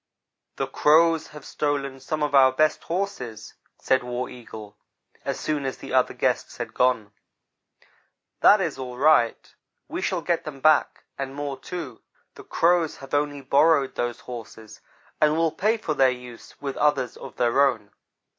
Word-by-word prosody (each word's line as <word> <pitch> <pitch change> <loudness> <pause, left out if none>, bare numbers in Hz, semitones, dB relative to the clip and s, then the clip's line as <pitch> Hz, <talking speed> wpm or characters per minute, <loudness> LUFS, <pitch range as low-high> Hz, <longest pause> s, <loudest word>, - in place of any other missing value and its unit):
"The - - -1
Crows 160 +1 +3
have 150 -2 -12
stolen 140 -2 -2
some 155 +3 -3
of 150 - -1
our 135 -1 +7
best 155 +4 +1
horses," 165 - -4 0.2
said 130 -1 +1
War 125 +1 -4
Eagle, 110 -4 -11 0.5
as - - -3
soon 150 -2 -2
as 135 -1 -3
the - - -9
other - - +2
guests - - -1
had - - -5
gone. 115 -5 +1 1.3
"That 205 0 +6
is 160 -7 -2
all 125 -1 -6
right 135 -4 +2 0.3
we - - -5
shall - - -1
get - - 0
them 145 -3 -8
back, 155 +2 +3 0.2
and 135 0 -4
more, 145 -1 -4
too. 140 -4 -7 0.3
The - - -12
Crows 170 -2 +1
have 135 +1 -12
only 145 -1 0
borrowed 140 +1 +3
those 120 -1 -3
horses 110 -3 -10 0.4
and 155 +1 +4
will 165 -1 +2
pay 215 +7 +1
for 165 -8 -3
their 135 -2 +4
use 125 -2 -9
with 140 -2 -5
others 140 -5 +1
of - - -10
their 125 +3 +3
own. 115 -7 0
135 Hz, 165 wpm, -24 LUFS, 125-155 Hz, 1.3 s, our